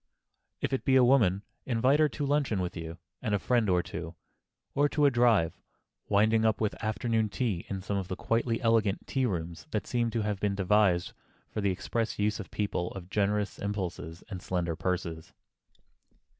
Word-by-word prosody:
If - - -1
it 135 - 0
be 135 - +3
a 130 - +7
woman, 110 -7 +4 0.2
invite 130 +4 +2
her 155 -1 +5
to 145 +2 -3
luncheon 140 -7 +1
with 90 0 -3
you 80 -1 -6 0.2
and 110 -4 0
a - - +3
friend 115 0 +1
or 90 -1 +3
two, 85 +1 -6 0.6
or 145 +1 +3
to 150 0 +2
a 140 - +5
drive, 120 -8 +3 0.5
winding 110 +2 +4
up 110 -1 +2
with 110 -2 0
afternoon 110 0 0
tea 100 -3 -2
in 95 -2 -4
some 100 +1 -1
of 95 -2 -3
the 95 - -3
quietly 115 +2 0
elegant 110 -3 +2
tea 130 -2 0
rooms 85 - -4
that 105 -7 -2
seem 120 -1 0
to 115 -1 -1
have 105 -2 -2
been 100 -1 0
devised 95 -2 +2 0.4
for 105 - -2
the 100 - +2
express 110 +5 -2
use 105 +1 0
of 105 - -7
people 100 -4 -2
of 95 -1 -9
generous 105 0 0
impulses 90 -5 -4
and 95 -5 -6
slender 85 -2 -1
purses. 85 -1 -3
105 Hz, 185 wpm, -29 LUFS, 90-115 Hz, 0.6 s, a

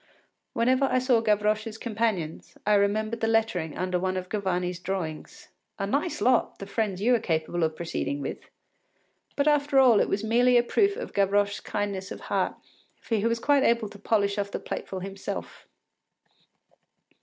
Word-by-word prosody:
Whenever 255 +4 +2
I 255 - +1
saw 250 -2 +3
Gavroche’s 215 0 0
companions, 215 -9 -3
I 210 - +3
remembered 215 +3 +1
the 225 - +1
lettering 220 -9 0
under 185 -1 -1
one 185 +1 -1
of 185 0 -5
Gavarni’s 180 -4 -1
drawings: 180 -4 -5 0.3
“A 195 - -2
nice 280 - -1
lot, 250 +4 +2
the 195 - -7
friends 200 -2 -2
you 245 +3 +4
are 240 - +3
capable 165 -1 -1
of 160 0 0
proceeding 160 -4 -3
with!” 135 - -6 0.9
But 285 +1 +1
after 290 -2 +3
all 250 -5 +7
it - - +1
was 200 - -1
merely 245 +3 +4
a 240 - +4
proof 400 - +2
of - - -6
Gavroche’s 200 0 +2
kindness 200 -2 -3
of - - -7
heart, - - -1 0.4
for - - -6
he 205 - -1
was 230 0 +1
quite 285 +4 +3
able 235 -3 +2
to 205 - -13
polish 200 -1 +1
off 200 0 -2
the - - -3
plateful 190 -1 -5
himself. 195 +1 -6
210 Hz, 170 wpm, -27 LUFS, 190-235 Hz, 0.9 s, all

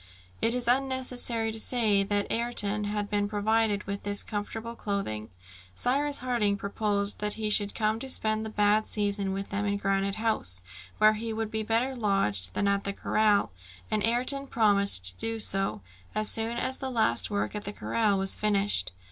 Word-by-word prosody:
It 230 - +2
is 245 -1 0
unnecessary 250 -3 0
to 220 - -3
say 220 -4 +2
that 205 +1 -1
Ayrton 210 -3 +1
had 205 0 -2
been 205 0 -1
provided 210 0 +1
with 200 0 -5
this 205 0 -2
comfortable 220 +2 -5
clothing. 195 - -4 0.5
Cyrus 280 - 0
Harding 215 -5 +1
proposed 200 0 -1
that 210 0 -2
he 215 -1 -2
should 205 -1 +3
come 220 0 0
to 265 - -6
spend 215 -3 0
the 220 - -5
bad 210 0 +2
season 200 -2 -1
with 195 +1 -5
them 200 +1 -1
in 200 0 0
Granite 195 0 0
House, 215 - -1 0.3
where 215 0 +5
he 225 +1 -4
would 220 0 -3
be 220 -1 -2
better 230 +5 0
lodged 150 - 0
than 200 - +1
at 200 0 +1
the 200 - -3
corral, 210 - +1 0.4
and 215 -1 +1
Ayrton 255 +4 +1
promised 200 - +3
to 90 0 +7
do 225 0 -3
so, 195 - 0 0.3
as 215 0 0
soon 225 +1 +2
as 260 +2 -2
the 265 - -3
last 220 - +1
work 205 -1 -2
at 210 -1 -6
the 205 - -3
corral 210 -1 0
was 195 0 +2
finished. 200 - +1
210 Hz, 180 wpm, -28 LUFS, 200-225 Hz, 0.5 s, to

